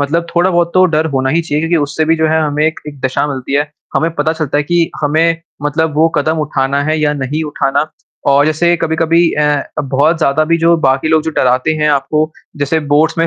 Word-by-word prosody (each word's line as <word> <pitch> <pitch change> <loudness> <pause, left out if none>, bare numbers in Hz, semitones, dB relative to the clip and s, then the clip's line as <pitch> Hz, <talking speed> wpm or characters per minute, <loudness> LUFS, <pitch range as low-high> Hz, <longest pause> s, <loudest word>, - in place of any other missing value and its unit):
मतलब 165 +4 -1
थोड़ा-बहुत 175 -1 +2
तो 185 0 +5
डर 155 +1 +1
होना 130 -1 0
ही 165 - +2
चाहिए 150 -1 -2
क्योंकि 165 +1 +1
उससे 145 +2 -1
भी 165 +1 +2
जो 160 - +1
है 160 0 +2
हमें 150 0 0
एक-एक 150 -3 -5
दशा 130 +2 -1
मिलती 135 -2 -5
है। 145 - +3 0.3
हमें 165 +1 +1
पता 155 +1 0
चलता 155 -3 -2
है - - +1
कि 170 +1 +1
हमें 165 +3 +1 0.2
मतलब 150 +1 -1
वो 160 +2 +3
कदम 155 +2 0
उठाना 140 -2 -1
है 155 0 0
या 150 -1 +1
नहीं 145 +2 -3
उठाना 145 0 -1 0.4
और 140 +1 +4
जैसे 170 +3 +2
कभी-कभी 165 +1 +1
अ, 150 -1 +1 0.2
बहुत 145 +4 +1
ज़्यादा 155 0 +2
भी 165 +2 +1
जो 170 +1 +3
बाकी 135 -1 +1
लोग 160 -1 +3
जो 160 - -3
डराते 130 +4 +2
हैं 150 0 +1
आपको 150 +3 0 0.3
जैसे 145 +3 0
बोर्ड्स 155 +2 +2
में 165 - +2
155 Hz, 215 wpm, -14 LUFS, 145-165 Hz, 0.4 s, तो